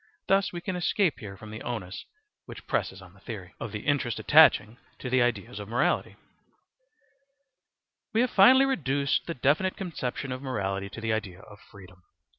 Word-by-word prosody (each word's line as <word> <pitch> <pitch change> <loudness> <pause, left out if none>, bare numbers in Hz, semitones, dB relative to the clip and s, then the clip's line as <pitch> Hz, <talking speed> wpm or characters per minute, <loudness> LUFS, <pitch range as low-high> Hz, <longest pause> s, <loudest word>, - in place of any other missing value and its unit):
Thus 195 0 +2
we 175 - -6
can 185 +1 -4
escape 180 0 +1
here 100 -5 -9
from 110 0 -11
the 110 - -8
onus 100 -6 -5 0.4
which - - -10
presses - - -2
on - - -16
the - - -20
theory. - - -8
Of - - -5
the - - -5
Interest 135 -6 0
attaching 110 +3 +5 0.2
to 125 - -6
the 130 0 +4
Ideas 110 -4 -1
of 105 - -7
Morality 120 +3 0 2.0
We 225 - +2
have 250 - +1
finally 260 +7 +7
reduced 140 - 0
the 170 - -3
definite 155 +9 +1
conception 135 -7 -4
of 130 0 -5
morality 100 -7 -3
to 110 - -9
the 110 -1 0
idea 100 -4 -4
of 105 -1 -15
freedom. 95 -2 -15
125 Hz, 175 wpm, -27 LUFS, 105-170 Hz, 2.0 s, finally